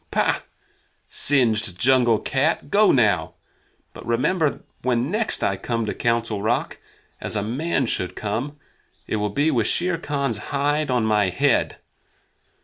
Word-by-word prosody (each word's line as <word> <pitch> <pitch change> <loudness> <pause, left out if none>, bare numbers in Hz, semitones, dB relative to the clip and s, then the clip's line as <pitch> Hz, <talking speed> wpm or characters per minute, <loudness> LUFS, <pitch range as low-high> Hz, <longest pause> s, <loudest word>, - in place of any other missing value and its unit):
"Pah! - - +1 0.7
Singed 110 -9 +2
jungle 120 -1 +4
cat 145 +5 -1
go 210 +1 +5
now! 100 -10 +2 0.6
But - - -10
remember 145 +7 0 0.2
when 125 +3 0
next 215 +1 0
I 95 - 0
come 115 +3 -2
to 105 - -2
the - - -7
Council 115 -3 -1
Rock, 110 +3 -1 0.4
as - - -4
a 105 - 0
man 135 +5 -1
should 90 -5 -2
come, 120 +8 -4 0.5
it - - -2
will 105 0 -1
be 145 +9 +1
with 115 -6 +1
Shere 175 -1 0
Khan's 140 - -2
hide 145 +1 0
on 125 -3 +1
my 105 -3 +2
head. 90 - +1
120 Hz, 145 wpm, -22 LUFS, 110-145 Hz, 0.7 s, go